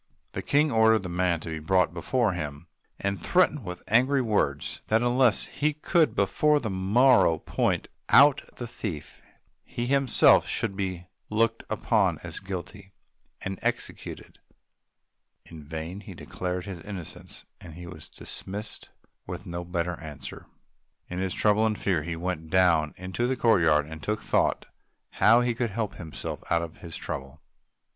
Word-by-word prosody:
The -, -, -4 dB
King 150 Hz, +1 st, +2 dB
ordered 110 Hz, -2 st, +4 dB
the 90 Hz, -, -5 dB
man 85 Hz, -1 st, 0 dB
to 85 Hz, -, -7 dB
be 80 Hz, -1 st, -4 dB
brought 85 Hz, +2 st, +2 dB
before 110 Hz, +6 st, +1 dB
him, 75 Hz, -3 st, -5 dB, 0.3 s
and 100 Hz, -3 st, -2 dB
threatened 175 Hz, -, +2 dB
with 90 Hz, -2 st, -7 dB
angry 130 Hz, +5 st, +3 dB
words 75 Hz, -, -1 dB
that 110 Hz, +2 st, +2 dB
unless 120 Hz, -2 st, +3 dB
he 150 Hz, +2 st, -1 dB
could 160 Hz, +2 st, +2 dB
before 150 Hz, -1 st, +3 dB
the 110 Hz, -6 st, -3 dB
morrow 100 Hz, -1 st, +4 dB
point -, -, -1 dB, 0.2 s
out 140 Hz, +1 st, +7 dB
the 120 Hz, -, -5 dB
thief, 85 Hz, -10 st, -6 dB, 0.4 s
he 120 Hz, -, -4 dB
himself 135 Hz, -1 st, +5 dB
should 95 Hz, -, -1 dB
be 95 Hz, -3 st, -3 dB, 0.2 s
looked 115 Hz, +1 st, +1 dB
upon -, -, +1 dB
as -, -, -5 dB
guilty 95 Hz, +1 st, -7 dB, 0.5 s
and 95 Hz, -1 st, -5 dB
executed. -, -, -4 dB, 1.1 s
In 80 Hz, -3 st, -11 dB
vain 80 Hz, +5 st, -6 dB
he 100 Hz, -, -10 dB
declared 90 Hz, 0 st, -4 dB
his 95 Hz, -4 st, -7 dB
innocence; 95 Hz, -5 st, -9 dB, 0.2 s
he 85 Hz, +1 st, -10 dB
was 85 Hz, -3 st, -11 dB
dismissed 105 Hz, +3 st, -7 dB, 0.4 s
with -, -, -6 dB
no 85 Hz, 0 st, -5 dB
better 85 Hz, -1 st, -3 dB
answer. 75 Hz, -4 st, -9 dB, 0.6 s
In 90 Hz, -, -4 dB
his 95 Hz, -1 st, -2 dB
trouble 105 Hz, 0 st, +3 dB
and 110 Hz, -1 st, -1 dB
fear 90 Hz, -6 st, 0 dB
he 85 Hz, +2 st, -4 dB
went 80 Hz, -2 st, -4 dB
down 85 Hz, -4 st, +3 dB
into 95 Hz, +7 st, -2 dB
the 130 Hz, -, 0 dB
courtyard 80 Hz, -11 st, +4 dB
and 80 Hz, 0 st, -9 dB
took 105 Hz, +5 st, -2 dB
thought -, -, +1 dB, 0.5 s
how 115 Hz, +3 st, +5 dB
to 120 Hz, 0 st, 0 dB
help 105 Hz, -1 st, -3 dB
himself 80 Hz, -4 st, -6 dB
out 85 Hz, 0 st, +2 dB
of 85 Hz, 0 st, -8 dB
his 85 Hz, -2 st, -8 dB
trouble. 70 Hz, +3 st, -6 dB
95 Hz, 150 wpm, -27 LUFS, 85-115 Hz, 1.1 s, out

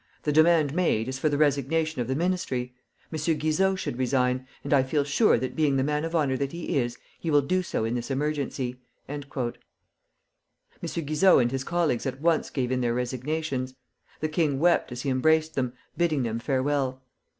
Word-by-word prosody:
The 150 Hz, -, +1 dB
demand 155 Hz, -1 st, +4 dB
made 155 Hz, -10 st, +1 dB
is 130 Hz, 0 st, -4 dB
for 155 Hz, -, +2 dB
the 145 Hz, -, 0 dB
resignation 150 Hz, +1 st, +1 dB
of 120 Hz, -, -3 dB
the 130 Hz, -, -1 dB
Ministry. 140 Hz, -7 st, -1 dB, 0.4 s
M. 155 Hz, -, -2 dB, 0.2 s
Guizot 190 Hz, +6 st, +1 dB
should 125 Hz, -9 st, -4 dB
resign, 130 Hz, 0 st, +1 dB, 0.2 s
and 140 Hz, -, -1 dB
I 140 Hz, -, +6 dB
feel 140 Hz, +3 st, 0 dB
sure 145 Hz, +11 st, +3 dB
that 130 Hz, +2 st, -4 dB
being 150 Hz, -3 st, +2 dB
the 135 Hz, -, +2 dB
man 150 Hz, +2 st, 0 dB
of 165 Hz, +1 st, -3 dB
honor 145 Hz, -5 st, +2 dB
that 140 Hz, +2 st, -2 dB
he 170 Hz, 0 st, -3 dB
is, 120 Hz, -1 st, -2 dB, 0.2 s
he 165 Hz, -, -3 dB
will 145 Hz, -2 st, +4 dB
do 185 Hz, +6 st, +1 dB
so 140 Hz, -10 st, -2 dB
in 115 Hz, -, -1 dB
this 120 Hz, +1 st, -3 dB
emergency." 135 Hz, -3 st, -2 dB, 0.3 s
M. 145 Hz, +1 st, -5 dB, 1.6 s
Guizot 165 Hz, +4 st, +3 dB
and 120 Hz, -, 0 dB
his 135 Hz, 0 st, -2 dB
colleagues 160 Hz, -6 st, 0 dB
at 130 Hz, 0 st, -4 dB
once 165 Hz, +1 st, +1 dB
gave 125 Hz, -3 st, -2 dB
in 130 Hz, 0 st, 0 dB
their 120 Hz, -1 st, 0 dB
resignations. 130 Hz, +1 st, -2 dB, 0.5 s
The 155 Hz, -, 0 dB
king 155 Hz, -3 st, +1 dB
wept 170 Hz, -2 st, +2 dB
as 125 Hz, 0 st, -5 dB
he 140 Hz, -, 0 dB
embraced 160 Hz, +4 st, +2 dB
them, 125 Hz, -4 st, -1 dB, 0.2 s
bidding 155 Hz, -5 st, +1 dB
them 115 Hz, -1 st, -2 dB
farewell. 130 Hz, 0 st, -1 dB
140 Hz, 190 wpm, -26 LUFS, 130-160 Hz, 1.6 s, I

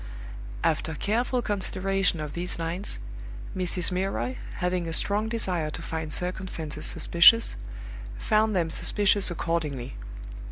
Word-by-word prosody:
After 160 Hz, 0 st, 0 dB
careful 240 Hz, -, 0 dB
consideration 195 Hz, -3 st, 0 dB
of 150 Hz, -1 st, -5 dB
these 175 Hz, +1 st, -3 dB
lines, 170 Hz, +4 st, -3 dB, 0.6 s
Mrs. 180 Hz, -1 st, 0 dB
Milroy, 195 Hz, +7 st, -1 dB, 0.2 s
having 180 Hz, -1 st, -1 dB
a 165 Hz, -, -3 dB
strong 210 Hz, +5 st, +2 dB
desire 180 Hz, -9 st, -1 dB
to 155 Hz, -, -6 dB
find 160 Hz, -2 st, -4 dB
circumstances 180 Hz, -4 st, -2 dB
suspicious, 225 Hz, +7 st, +5 dB, 0.6 s
found 215 Hz, -1 st, +2 dB
them 165 Hz, -3 st, +1 dB
suspicious 205 Hz, +2 st, +2 dB
accordingly. 155 Hz, -7 st, -2 dB
180 Hz, 115 wpm, -27 LUFS, 165-200 Hz, 0.6 s, suspicious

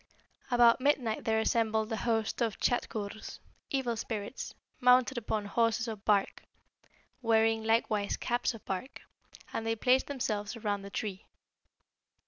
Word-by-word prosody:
"About 240 Hz, 0 st, +5 dB
midnight 255 Hz, -5 st, +1 dB
there 220 Hz, 0 st, +2 dB
assembled 220 Hz, 0 st, +1 dB
a -, -, +1 dB
host 225 Hz, +1 st, -1 dB
of 225 Hz, -3 st, 0 dB
Tschadkurrs 215 Hz, -3 st, -2 dB, 0.3 s
(evil 260 Hz, -4 st, 0 dB
spirits) 220 Hz, +1 st, -5 dB, 0.2 s
mounted 250 Hz, +1 st, +5 dB
upon 215 Hz, -2 st, -2 dB
horses 230 Hz, +2 st, +1 dB
of 215 Hz, -3 st, -6 dB
bark, 205 Hz, -2 st, +2 dB, 0.8 s
wearing 225 Hz, -1 st, +3 dB
likewise 220 Hz, -2 st, +1 dB
caps 240 Hz, 0 st, -1 dB
of 220 Hz, -, -13 dB
bark, 195 Hz, +8 st, -5 dB, 0.5 s
and 225 Hz, -, -2 dB
they 225 Hz, 0 st, 0 dB
placed 255 Hz, +3 st, +3 dB
themselves 215 Hz, -6 st, -2 dB
around 205 Hz, -3 st, -2 dB
the 200 Hz, -, -8 dB
tree. 200 Hz, -2 st, -5 dB
225 Hz, 130 wpm, -31 LUFS, 215-240 Hz, 0.8 s, About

